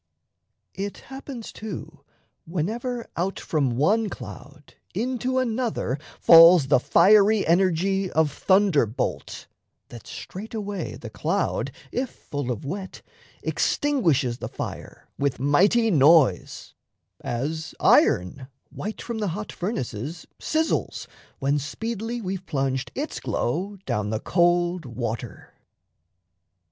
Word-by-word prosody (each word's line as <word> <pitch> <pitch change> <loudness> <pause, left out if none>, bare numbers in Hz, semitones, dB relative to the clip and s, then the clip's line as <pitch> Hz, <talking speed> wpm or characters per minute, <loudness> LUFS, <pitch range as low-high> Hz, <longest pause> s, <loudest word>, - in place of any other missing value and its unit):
It 200 +1 -5 0.2
happens, 265 -4 -8
too, 210 -7 -8 0.4
whenever 230 +9 -3
Out 185 +3 -2
from 135 -7 -1
one 210 - +2
cloud 130 - -11 0.2
into 255 +4 -1
another 230 - -1 0.2
falls 165 -2 +8
The 140 - +5
fiery 205 - +5
energy 190 +2 +2
of 160 -3 +2
thunderbolt, 150 - +1 0.4
That 120 - -11
straightaway 205 0 -6
the - - -9
cloud, - - -1 0.2
if 255 0 -2
full 145 -3 -6
of 120 +2 -5
wet, 190 +5 -6 0.4
Extinguishes 160 - +1
the - - -5
fire - - -7
with 140 -2 0
mighty 195 - +3
noise; 145 - +3 0.5
As 155 +7 -3
iron, 110 +9 +3 0.2
white 215 +3 -6
from 235 -2 -4
the 210 - -1
hot 210 - -6
furnaces, 160 - -4
Sizzles, 320 0 -1 0.3
when 140 +2 +1
speedily 225 - -4
we've 190 -2 -5
plunged 135 -2 -1
its - - -4
glow 190 +11 -2
Down 105 0 -1
the 110 0 -1
cold 175 +1 +2
water. 120 -1 -6
175 Hz, 110 wpm, -24 LUFS, 140-215 Hz, 0.5 s, falls